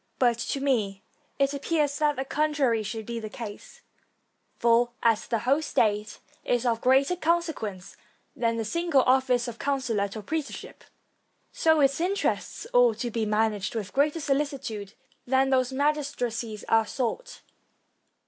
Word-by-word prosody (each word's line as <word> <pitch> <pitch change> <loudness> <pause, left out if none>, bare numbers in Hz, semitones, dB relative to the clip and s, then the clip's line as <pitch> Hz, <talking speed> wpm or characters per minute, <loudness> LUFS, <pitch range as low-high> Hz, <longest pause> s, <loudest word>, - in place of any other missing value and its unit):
But 240 -2 +2
to 275 - -2
me 215 -8 0 0.3
it 275 0 +2
appears 290 0 0
that 300 -1 +2
the 265 - -3
con 300 +2 0
trary 235 -7 +2
should 220 +1 -5
be 235 +1 -4
the 215 -1 -6
case, 210 -1 -9 0.8
for, 235 +1 +3
as 225 -2 +2
the 230 - 0
whole 275 +4 +3
state 215 -7 0 0.3
is 245 0 0
of 230 -2 +1
greater 270 +6 +3
consequence 320 - -2 0.4
than 230 -1 0
the 225 - -2
single 335 0 +2
office 255 -1 +2
of 235 -1 -7
consulate 230 -8 -1
or 215 - -7
praetorship, 315 +1 -5 0.7
so 320 -2 +3
its 275 +3 +2
interests 390 +5 -1
ought - - +5
to 240 -2 -3
be 220 -1 -1
managed 210 -1 0
with 210 -3 -4
greater 295 +4 +2
solicitude 275 -8 -2 0.3
than 265 +1 +2
these 255 -1 +2
magistracies 265 -6 -2
are 225 -1 +3
sought. 285 - -4
255 Hz, 150 wpm, -27 LUFS, 225-290 Hz, 0.8 s, ought